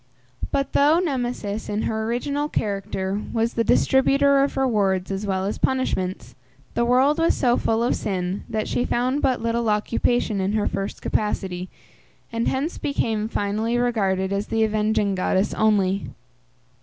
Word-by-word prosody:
But 275 -1 -1
though 295 +3 +5
Nemesis, 245 - -2
in 210 +1 -1
her 220 0 -1
original 285 +6 -1
character, 200 -2 -2
was 230 +1 0
the 230 - +1
distributor 275 +3 +4
of 280 - -2
rewards 200 -8 +1
as 195 +2 -3
well 190 -1 -1
as 205 - -3
punishments, 185 - -1 0.4
the 235 - +1
world 260 +6 +3
was 330 - +3
so 245 -3 +3
full 225 -1 0
of 245 - +1
sin, 185 -1 -3
that 220 -2 -2
she 245 - 0
found 255 +5 0
but 255 -3 +1
little 230 0 0
occupation 210 0 0
in 190 +2 0
her 215 -1 +1
first 195 0 -4
capacity, 185 -4 -2 0.6
and 230 0 -1
hence 280 +5 -1
became 225 -6 -1
finally 220 +2 -1
regarded 195 -6 0
as 200 +1 -2
the 225 0 +1
avenging 215 -1 +1
goddess 190 +1 0
only. 200 -3 +1
220 Hz, 155 wpm, -23 LUFS, 200-250 Hz, 0.6 s, though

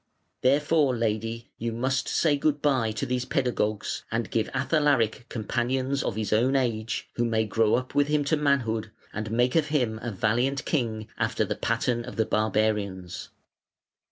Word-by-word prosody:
Therefore, 145 0 +3
lady, 115 +1 -2
you 115 +1 -2
must 130 +3 -1
say 155 -3 +2
'good 145 0 +1
bye' 130 -6 +2
to 110 - -2
these 125 0 -1
pedagogues, 120 -7 -1
and 115 0 -2
give 110 -1 0
Athalaric 135 -5 +1
companions 130 +4 -1
of - - -2
his 110 -1 -1
own 125 +5 +3
age, 115 -4 -1
who 120 - +2
may 110 -1 +1
grow 110 0 +2
up 130 +1 -3
with 145 0 +3
him 150 0 +2
to 145 +3 +2
manhood 125 -7 +1 0.2
and 110 +1 -4
make 120 +3 +1
of 160 -2 +3
him 125 -8 0
a 120 - -3
valiant 120 +7 0
king 110 -7 -1
after - - +1
the - - -1
pattern 120 -1 0
of 125 - -8
the 110 - +1
barbarians". 105 -4 -1
120 Hz, 165 wpm, -27 LUFS, 110-135 Hz, 0.2 s, Therefore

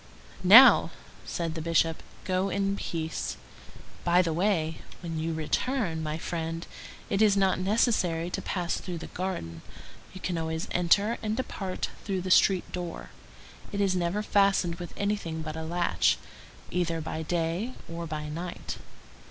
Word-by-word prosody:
"Now," 225 +9 +9 0.4
said 165 -2 -2
the 160 - -4
Bishop, 165 0 +1 0.2
"go 185 +1 0
in 195 +1 0
peace. 160 -4 -3 0.7
By 175 +1 +4
the 165 -2 -1
way, 165 -3 0 0.2
when 165 -2 -4
you 165 +1 -1
return, 165 - -1
my 155 0 -2
friend, 165 0 -4 0.5
it 195 - +2
is 205 -2 +5
not 190 -1 +3
necessary 185 -4 +1
to - - -2
pass 175 -3 -2
through 180 -2 -5
the 165 - -9
garden. 85 - -4 0.5
You 185 - -9
can 180 -2 -2
always 160 0 -3
enter 200 +6 +3
and 215 +1 -2
depart 195 -7 -3
through 190 -2 -2
the 185 +1 -3
street 185 -1 +4
door. 175 -2 -6 0.6
It 200 - -3
is 195 -2 +2
never 180 +4 0
fastened 195 -4 +2
with 175 - -6
anything 200 -6 -2
but 155 0 -5
a 160 - -4
latch, 170 +2 +2 0.5
either 170 -2 0
by 160 0 -4
day 170 +8 -1
or 170 0 -5
by 155 -1 -4
night." 170 +4 -5
175 Hz, 150 wpm, -28 LUFS, 165-195 Hz, 0.7 s, Now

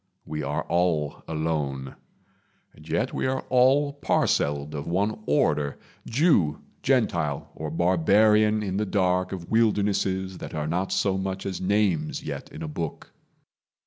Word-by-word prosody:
We 75 0 -4
are 70 +1 -2
all 85 -4 0
alone; 75 -4 -2 0.8
And 75 +1 -15
yet - - 0
we - - -1
are 130 0 -1
all 135 +3 +4
parcelled 75 - 0
of 70 -1 -5
one 100 +5 0
order 75 0 +1 0.3
Jew, 115 - +2 0.2
Gentile, 85 - 0
or 80 0 -5
barbarian 105 +6 +3
in 95 -2 -2
the 105 - 0
dark 90 -1 +1
Of 90 -3 -7
wildernesses 100 -4 +1
that - - -7
are 75 -1 -2
not 90 +5 -1
so 95 -1 +1
much 95 0 -4
As 95 -2 -4
names 95 -6 +1
yet - - -6
in - - -7
a - - -4
book. 75 +1 -6
90 Hz, 145 wpm, -26 LUFS, 75-105 Hz, 0.8 s, all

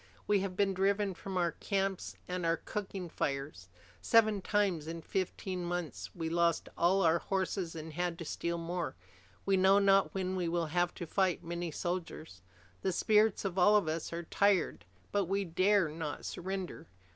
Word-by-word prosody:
We 205 -1 +3
have 190 -1 -3
been 195 0 +2
driven 195 +1 +1
from 190 +2 -5
our 175 -2 +2
camps 195 -2 -2
and 180 0 -3
our 165 0 +2
cooking 195 -2 -5
fires. 135 - -3 0.3
Seven 215 - +4
times 185 -6 +1
in 165 0 -5
fifteen 185 -1 -3
months 175 -2 -4
we 165 -2 -3
lost 170 0 +1
all 190 +3 +3
our 165 0 +4
horses 190 -2 -2
and 160 0 -7
had 175 +1 -1
to 170 - -6
steal 170 +2 -2
more. 170 - -3 0.5
We 195 -1 +3
know 190 +1 +6
not 195 -1 +4
when 190 -1 -1
we 180 -2 -1
will 170 0 0
have 175 0 +1
to 175 - -5
fight 185 +1 +1
many 170 +1 -3
soldiers. 165 - -4 0.4
The 190 - 0
spirits 210 +3 +3
of 190 -1 -1
all 205 +4 +6
of 205 -6 +3
us 160 +1 -2
are 170 +1 -4
tired, 200 +2 +1 0.3
but 200 -1 +1
we 195 +2 0
dare 185 +2 +3
not 155 -1 -5
surrender." 185 -2 -5
180 Hz, 175 wpm, -32 LUFS, 170-195 Hz, 0.5 s, know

